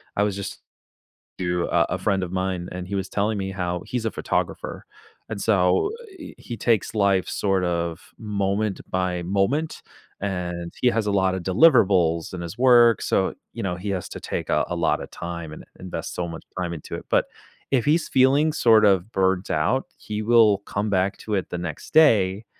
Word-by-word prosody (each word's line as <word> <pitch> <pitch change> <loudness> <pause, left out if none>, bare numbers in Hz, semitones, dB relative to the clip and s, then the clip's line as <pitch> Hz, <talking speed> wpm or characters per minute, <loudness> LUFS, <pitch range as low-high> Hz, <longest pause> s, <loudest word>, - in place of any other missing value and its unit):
I 105 - +1
was 100 -2 0
just 100 -1 -6 0.8
to 90 -1 0
a 85 -1 +3
a - - -3
friend 95 0 0
of 90 - -5
mine, 95 -1 -2
and 90 0 -6
he 100 - -4
was 95 -1 -3
telling 105 +1 0
me 95 0 -3
how 90 -2 -3
he's 120 -3 -3
a 110 - 0
photographer - - -3 0.4
and 105 -3 -5
so, 95 - +3
uh, 475 - -12
eh, - - -9
he 120 -2 -7
takes 115 0 +1
life 100 -4 +2
sort 95 -2 0
of 85 -1 -2 0.2
moment 100 -1 -1
by 90 -1 -1
moment, 100 - 0 0.4
and 90 -3 -4
he 125 - +5
has 115 -3 -1
a - - +1
lotta 95 -1 +1
deliverables 95 - +3
in 90 - -5
his 85 +6 -7
work, 120 -2 +6
so, 95 - +1 0.2
you 115 - -5
know, 90 -2 -1
he 100 +3 -5
has 95 -2 -3
to - - -7
take - - -4
a - - +2
a 85 - -2
lotta 85 -1 0
time 85 -2 -7
and - - -10 0.2
invest 95 -1 -6
so 90 - -2
much 80 - -8 0.2
time 90 -1 -2
into 80 - -7
it, - - -8
but - - +3 0.5
if 130 -4 +3
he's 160 +3 +2
feeling 140 +4 +4
sort 110 -7 +5
of 100 +2 +2
burnt 95 0 +1
out, 105 +13 +1
he 105 0 -5
will 110 -3 +5
come 100 +1 -3
back 95 +1 +1
to 110 - -6
it 95 - -2
the 90 - -4
next 85 -3 -6
day 105 -9 +4
95 Hz, 195 wpm, -24 LUFS, 90-110 Hz, 0.8 s, work